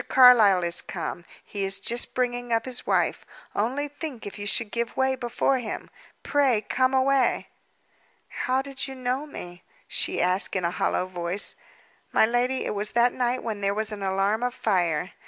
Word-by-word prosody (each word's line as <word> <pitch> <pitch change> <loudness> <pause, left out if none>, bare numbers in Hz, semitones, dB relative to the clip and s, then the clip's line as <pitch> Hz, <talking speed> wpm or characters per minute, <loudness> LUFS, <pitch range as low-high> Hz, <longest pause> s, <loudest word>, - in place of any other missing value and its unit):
Carlyle 225 -8 +7
is 170 0 0
come; 175 - -5 0.2
he 200 -1 -4
is 195 0 -1
just 235 +4 -2
bringing 245 -1 -1
up 225 0 +2
his 255 -1 -4
wife. - - +1 0.3
Only 260 +8 0
think 290 -4 -7
if 205 - -7
you 205 - -4
should 220 0 0
give 235 0 -3
way 265 0 +2
before 255 +1 0
him! 230 -3 -6 0.3
Pray 270 -7 +2
come 255 +4 +1
away!" 265 -1 +2 0.8
"How 260 +1 -1
did 275 0 -4
you 265 - -7
know 255 +3 -2
me?" 175 -10 -9 0.3
she - - -1
asked 180 +3 +1
in 185 -2 0
a 170 - +1
hollow 180 - 0
voice. 180 +1 -2 0.6
"My - - +5
lady, 245 +3 0
it - - -1
was 210 +1 -3
that 240 +1 +4
night 250 0 0
when 215 -3 -4
there 200 0 +1
was 220 +1 -1
an 210 -1 -6
alarm 195 +3 +1
of 245 0 -1
fire. 180 -7 0
235 Hz, 180 wpm, -26 LUFS, 195-255 Hz, 0.8 s, Carlyle